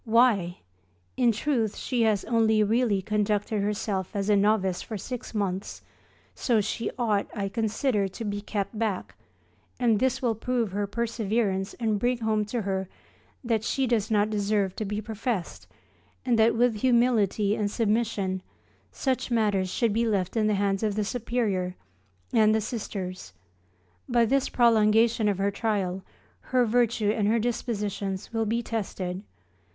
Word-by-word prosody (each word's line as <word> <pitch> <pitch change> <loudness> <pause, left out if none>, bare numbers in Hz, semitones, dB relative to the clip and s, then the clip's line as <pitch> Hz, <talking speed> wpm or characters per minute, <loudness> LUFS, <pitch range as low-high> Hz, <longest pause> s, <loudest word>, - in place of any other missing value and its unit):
Why! 220 -6 +3 0.6
in 245 -2 +4
truth 230 -2 -1
she 250 -3 -1
has 205 -3 0
only 220 -2 +3
really 215 -2 +1
conducted 210 0 0
herself 200 -2 -2
as 200 +1 0
a - - +5
novice 200 -3 +2
for 220 - -5
six 245 +3 -7
months, 195 -2 -3 0.5
so 235 -4 +1
she 215 +2 -2
ought, 215 -5 +1
I 200 -2 -2
consider, 220 0 0
to 205 +4 -7
be 205 0 -3
kept 205 0 -3
back, 215 -5 -2 0.7
and 230 -4 +3
this 260 +1 +1
will 240 -3 +1
prove 230 -1 -1
her 205 +1 -1
perseverance 215 -3 -1
and 220 -4 0
bring 245 +3 +1
home 220 -2 0
to 225 +1 -3
her 190 -1 -2 0.5
that 225 -3 0
she 270 +4 0
does 230 -4 0
not 210 -1 +2
deserve 205 -2 0
to 215 - -2
be 210 +1 -3
professed, 220 -3 -4 0.6
and 240 -3 +2
that 220 +1 +4
with 235 -1 +2
humility 220 -4 +2
and 210 -2 -1
submission, 210 -4 0 0.5
such 260 -2 -1
matters 205 -5 +1
should 230 +2 +1
be 230 +2 +1
left 195 -3 0
in 215 -2 +2
the 210 - +2
hands 195 -1 0
of 210 -2 0
the 215 - 0
Superior, 210 -6 -1 0.6
and 215 -1 +5
the - - +3
Sisters. 190 - -5 0.8
By 240 -1 +4
this 270 +3 +1
prolongation 225 -1 +4
of 200 - 0
her 200 +1 +1
trial, 195 -3 -1 0.4
her 250 -1 +1
virtue 230 -2 +2
and 215 -2 0
her 225 +2 +3
dispositions 210 -4 -3
will 225 -1 0
be 235 +2 0
tested. 190 -5 -4
215 Hz, 155 wpm, -27 LUFS, 200-235 Hz, 0.8 s, a